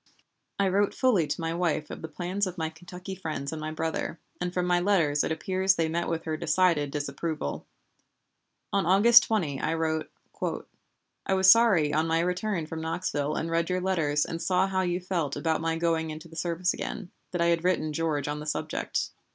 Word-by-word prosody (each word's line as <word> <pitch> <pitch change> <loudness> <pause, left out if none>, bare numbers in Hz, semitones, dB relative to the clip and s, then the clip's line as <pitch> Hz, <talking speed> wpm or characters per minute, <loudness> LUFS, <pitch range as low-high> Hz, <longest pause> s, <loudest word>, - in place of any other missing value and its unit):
I 200 - +2
wrote 200 +2 +1
fully 215 - +3
to - - -3
my 165 0 -1
wife 165 -3 -1
of - - -7
the 160 - -5
plans 185 +4 -2
of 185 0 -6
my 160 -1 -2
Kentucky 180 +3 -9
friends 155 -7 -4
and 160 -1 -5
my 155 - -3
brother, 160 +1 -3 0.2
and 180 0 -2
from 180 0 -1
my 180 0 +3
letters 170 -6 +2
it - - -2
appears 190 +3 +1
they 165 -2 +1
met 170 +2 -1
with 165 -1 -2
her 160 - -2
decided 165 -3 +2
disapproval. 145 - -4 1.1
On 195 -4 +1
August 210 +6 +8
20 165 -12 -1
I 160 - 0
wrote: 160 -1 -1 1.1
"I 190 - +1
was 190 0 +7
sorry 195 -11 +4
on 155 +2 +2
my 165 0 +2
return 180 0 -1
from 160 +1 -6
Knoxville 160 -3 -2
and 165 - -2
read 165 +1 +1
your 180 0 +1
letters 160 -6 +1
and 165 0 -5
saw 185 0 +2
how 190 -1 0
you 175 -1 0
felt 175 -6 -2
about 160 +2 0
my 165 0 0
going 165 -1 0
into 155 +2 -8
the 165 - -14
service 170 +2 0
again, 200 -5 -6 0.2
that 180 - -4
I 170 0 +3
had 165 0 -2
written 175 -4 +1
George 150 -3 -1
on 150 0 -3
the 150 - -7
subject." 150 - -2
165 Hz, 200 wpm, -27 LUFS, 160-185 Hz, 1.1 s, August